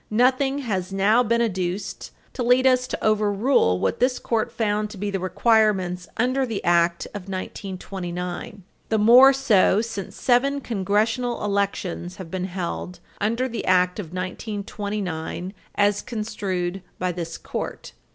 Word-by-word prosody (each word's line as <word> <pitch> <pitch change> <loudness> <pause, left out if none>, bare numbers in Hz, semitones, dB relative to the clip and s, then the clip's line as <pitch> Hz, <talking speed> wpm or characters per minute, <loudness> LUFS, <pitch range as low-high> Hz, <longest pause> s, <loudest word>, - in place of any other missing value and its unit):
Nothing 255 +5 +2
has 190 -4 -2
now 200 +5 +4
been 235 0 +2
adduced 185 -2 -3 0.2
to - - -4
lead 250 +2 +4
us 255 -1 +4
to - - -4
overrule 210 - +2
what - - -1
this 250 +1 +2
Court 225 -2 -1
found 210 -1 -1
to 210 - -10
be 205 +1 -3
the 195 - -1
requirements 185 -2 +2
under 255 +3 +1
the 225 -6 -3
Act 170 0 +2
of 195 -2 -7
1929, 185 0 -5 0.3
the 220 - +2
more 245 +5 +8
so 230 -8 +3
since 225 -4 -5
seven 275 +3 +2
Congressional 225 +1 0
elections 195 -3 -2
have 185 -5 -9
been 185 -1 -2
held 180 -1 -5 0.2
under 230 +5 0
the 235 -2 -4
Act 180 +1 +3
of 195 - -4
1929 190 -1 -4 0.2
as 205 0 +2
construed 195 -5 -3 0.2
by 180 0 -1
this 165 -1 -5
Court. - - -6
205 Hz, 140 wpm, -24 LUFS, 185-230 Hz, 0.3 s, more